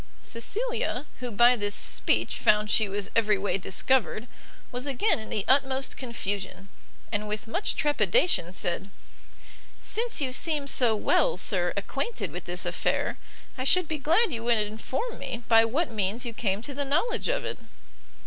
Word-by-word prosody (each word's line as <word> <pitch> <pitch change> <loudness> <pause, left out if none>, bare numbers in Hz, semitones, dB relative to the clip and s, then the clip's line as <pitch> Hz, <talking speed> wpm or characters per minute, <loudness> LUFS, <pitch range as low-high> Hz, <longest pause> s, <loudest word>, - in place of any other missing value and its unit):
Cecilia, 405 - -2
who 250 -1 -4
by 240 +3 +5
this 205 -3 0
speech - - +1
found 210 0 +3
she 215 -3 +3
was 200 0 -3
every 215 -2 +3
way 195 0 -1
discovered, 230 +4 +1 0.4
was 250 +3 -4
again 280 - +1
in 220 - -7
the 205 - -2
utmost 265 0 +2
confusion, 200 -5 -4 0.4
and 210 0 -2
with 210 +1 -4
much 355 - -2
trepidation, 295 - +2
said, 185 +1 -2 0.9
"since 465 +1 0
you 260 -3 -1
seem 300 0 +2
so 245 -5 +3
well, 475 - +2
sir, - - 0
acquainted 470 - -3
with - - -6
this - - -2
affair, - - -1 0.4
I - - -1
should 360 +6 +3
be 310 -1 -3
glad 335 - +3
you 230 -1 -4
would 235 -1 +3
inform 220 - -3
me 245 -2 -5
by 225 0 +6
what 280 +6 -1
means 215 +3 -1
you 235 - -4
came 205 -2 -1
to 280 - -4
the 285 +1 -2
knowledge 315 - 0
of - - -1
it?" - - -3
240 Hz, 165 wpm, -27 LUFS, 210-290 Hz, 0.9 s, by